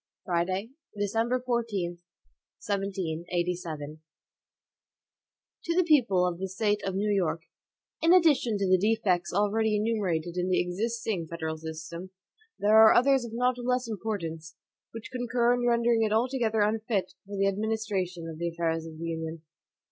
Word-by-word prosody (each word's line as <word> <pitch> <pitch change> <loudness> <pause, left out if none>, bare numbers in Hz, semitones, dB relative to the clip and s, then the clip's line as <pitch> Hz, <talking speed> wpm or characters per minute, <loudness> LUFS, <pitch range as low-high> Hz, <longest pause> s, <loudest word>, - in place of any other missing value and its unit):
Friday, 185 +5 -1 0.3
December 225 +5 0
14, 225 -8 -2 0.7
1787. 175 -3 -2
HAMILTON 150 +2 -9 1.6
To 335 - 0
the 365 - +4
People 240 - +3
of 175 -1 -2
the 190 - -2
State 205 +2 0
of 195 -1 -2
New 205 +1 +1
York: 170 -3 0 0.6
IN 330 +1 +4
ADDITION 300 - +4
to 200 -1 0
the 185 0 +4
defects 200 -4 +1
already 210 +3 +1
enumerated 190 -6 -1
in 180 +1 0
the 185 - +3
existing 205 0 -2
federal 160 -1 -4
system, 160 +3 -7 0.5
there 210 +2 +4
are 220 0 +8
others 270 0 +4
of 230 - -8
not 250 +1 +1
less 250 0 0
importance, 175 -7 -4 0.4
which 225 0 -9
concur 245 -1 +1
in 245 0 0
rendering 235 -1 +3
it 215 -1 +1
altogether 225 -1 +1
unfit 215 -2 0
for 200 0 -6
the 195 - +2
administration 195 -4 -2
of 160 -1 -8
the 170 0 -1
affairs 165 -1 -2
of 160 -1 -10
the 165 - -5
Union. 160 -1 -4
200 Hz, 150 wpm, -28 LUFS, 175-230 Hz, 1.6 s, are